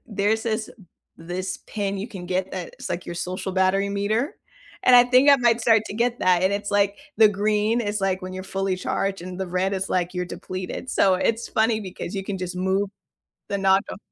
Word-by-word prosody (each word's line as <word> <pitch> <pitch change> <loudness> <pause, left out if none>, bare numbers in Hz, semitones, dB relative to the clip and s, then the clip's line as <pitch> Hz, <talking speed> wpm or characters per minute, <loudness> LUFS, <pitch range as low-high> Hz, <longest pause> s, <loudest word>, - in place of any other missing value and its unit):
There's 210 +1 0
this 220 -1 -1 0.5
this 180 +2 -4
pin 200 -2 -2
you 205 - -5
can 185 -6 -8
get 185 +1 -1
that 180 -2 -6
it's - - -8
like 175 +1 -3
your 170 - -5
social 185 +2 -4
battery 190 +1 +2
meter, 215 - -1 0.5
and 250 - +8
I 245 - +8
think 255 +3 +5
I 280 - +8
might 240 -2 +3
start 225 -1 +4
to - - -6
get 235 +2 0
that, 180 -1 +3
and 190 - +3
it's, 205 0 -2
like 200 0 +2 0.2
the 220 -1 +8
green 210 +3 +1
is, 205 0 -2
like, 190 -1 0
when 185 0 -6
you're 185 - -6
fully 195 -1 0
charged, 195 0 -2
and 180 0 -7
the 190 - -2
red 185 +2 0
is, 190 0 -2
like, 180 0 0
you're 180 0 -1
depleted, 185 +7 -6
so, 190 -1 +4
it's 230 +4 0
funny 220 0 +1
because 190 -1 -7
you 195 -1 -3
can 195 -1 -4
just 180 0 -5
move 190 +2 0 0.6
the 200 - -1
knob 195 0 +4
do - - -6
195 Hz, 220 wpm, -24 LUFS, 185-220 Hz, 0.6 s, and